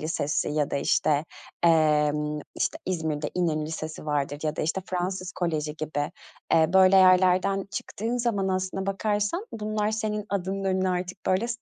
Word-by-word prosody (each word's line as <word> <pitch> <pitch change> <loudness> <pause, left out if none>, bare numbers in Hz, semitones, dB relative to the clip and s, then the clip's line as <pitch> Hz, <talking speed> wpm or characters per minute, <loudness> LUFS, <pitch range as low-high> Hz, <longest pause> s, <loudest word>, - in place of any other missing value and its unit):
Lisesi 150 -2 -1
ya 150 -1 0
da, - - 0
işte, 145 +1 +2 0.4
emm, 150 -2 +3 0.2
işte, - - -1
İzmir'de 160 -4 -2
İnönü 160 -4 0
Lisesi 155 -1 -6
vardır 145 -1 -1
ya 155 0 -2
da, - - -1
işte, 165 +5 -1
Fransız 185 +1 -3
Koleji 155 -4 -2
gibi, 150 -2 -2 0.4
eee, 160 +1 +4
böyle 190 0 +6
yerlerden 185 +1 +4
çıktığın 225 +3 -3
zaman 225 -6 0
aslına 190 +1 -2
bakarsan 205 - -1
bunlar 215 -1 -1
senin 215 -1 -2
adının 195 0 -2
önüne 190 0 +1
artık, 180 +1 -4
böyle, 190 +5 +2
180 Hz, 150 wpm, -26 LUFS, 155-195 Hz, 0.4 s, böyle